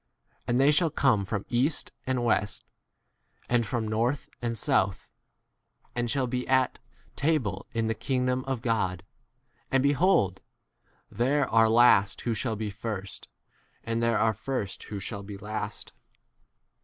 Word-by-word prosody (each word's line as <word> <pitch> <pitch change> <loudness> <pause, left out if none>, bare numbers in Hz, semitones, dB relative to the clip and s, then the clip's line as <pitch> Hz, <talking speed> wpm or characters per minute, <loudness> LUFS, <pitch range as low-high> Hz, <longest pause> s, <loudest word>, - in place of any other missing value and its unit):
And 120 +1 +2
they 140 +2 +6
shall 165 +2 +4
come 130 -9 +2
from 100 +1 -3
east 130 +5 0 0.2
and 125 -2 0
west, 105 -3 0 0.8
and 120 -2 +1
from 115 -2 -2
north 115 +6 -1
and 115 -1 -2
south, 95 -2 +1 0.8
and 120 -1 -1
shall 135 +1 +1
be 125 0 -3
at 130 -1 +2 0.4
table 125 - 0
in 115 -1 -1
the 110 - +1
king 125 +4 -1
30 125 - 0
dom 125 0 0
of 135 -3 -3
God. 95 -6 0 0.7
And 135 -1 +2
behold, 140 - +3 0.7
there 135 +6 +1
are 115 0 +4
last 110 -4 +5
who 120 - -1
shall 110 +1 -1
be 105 -1 -4
first, 100 -2 -6 0.6
and 115 0 -2
there 115 -1 +2
are 110 0 +2
first 110 -2 -4
who 105 - -6
shall 100 +1 -5
be 100 0 -8
last. 105 +2 -5
115 Hz, 150 wpm, -28 LUFS, 105-130 Hz, 0.8 s, they